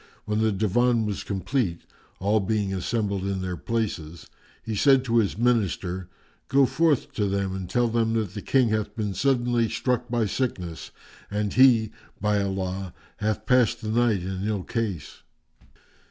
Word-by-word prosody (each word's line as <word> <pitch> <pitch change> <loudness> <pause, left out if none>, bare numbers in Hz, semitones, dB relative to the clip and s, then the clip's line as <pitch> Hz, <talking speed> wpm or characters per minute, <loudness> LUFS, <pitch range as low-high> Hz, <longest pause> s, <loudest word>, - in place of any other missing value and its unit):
When 105 0 -1
the 110 0 +2
Divan 110 +3 +2
was 105 -2 -3
complete 95 -2 -1 0.4
all 105 +3 +2
being 100 -1 -1
assembled 100 +1 -1
in 95 -1 -2
their 90 -1 -3
places 90 -7 -3 0.4
he 110 - -3
said 135 +4 +5
to 120 -1 +1
his 100 -3 0
Minister, 95 -6 0 0.4
"Go 135 +1 +4
forth 155 0 +1
to 105 -2 0
them 95 -1 -1
and 95 -2 -5
tell 120 +5 +2
them 115 -1 +1
that 110 -5 -1
the 105 - -5
King 130 0 +2
hath 110 -1 -1
been 105 -3 -2
suddenly 120 -2 +1
struck 125 +2 -1
by 120 -2 +1
sickness 90 -8 -3 0.4
and 105 0 -2
he, 120 -4 +5 0.3
by 105 0 +1
Allah, 95 -1 -3 0.2
hath 110 0 -2
passed 125 -3 +3
the 110 - -4
night 110 -4 +2
in 95 +2 -3
ill 105 -4 -1
case." 100 -11 -4
105 Hz, 160 wpm, -25 LUFS, 95-120 Hz, 0.4 s, said